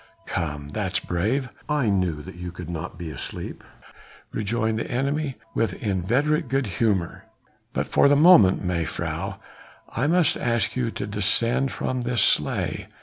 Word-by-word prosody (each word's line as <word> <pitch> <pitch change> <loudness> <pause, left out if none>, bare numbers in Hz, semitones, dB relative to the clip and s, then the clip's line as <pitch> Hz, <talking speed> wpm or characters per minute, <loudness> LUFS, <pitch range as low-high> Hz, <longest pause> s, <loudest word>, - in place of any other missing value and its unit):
"Come! 75 -3 -3
that's - - -1
brave! 110 +10 -1 0.2
I 145 -7 +2
knew 90 -6 0
that - - -9
you 90 0 -6
could 85 -1 -7
not 85 +1 -5
be 85 -3 -6
asleep," 70 - -7 0.7
rejoined 110 +1 -1
the - - -4
enemy 140 +2 -1 0.2
with 110 -5 0
inveterate 125 - 0
good 135 +1 0
humour, 100 -3 -1 0.5
"but - - -1
for - - +4
the 145 - +5
moment, 145 - +7
mejuffrouw, 85 -3 -2 0.6
I 135 - +1
must 170 -1 +3
ask 115 -4 0
you 125 -2 0
to - - -4
descend 115 +6 +1
from 130 -1 -2
this 120 -1 +1
sleigh. - - +1
110 Hz, 145 wpm, -24 LUFS, 90-135 Hz, 0.7 s, moment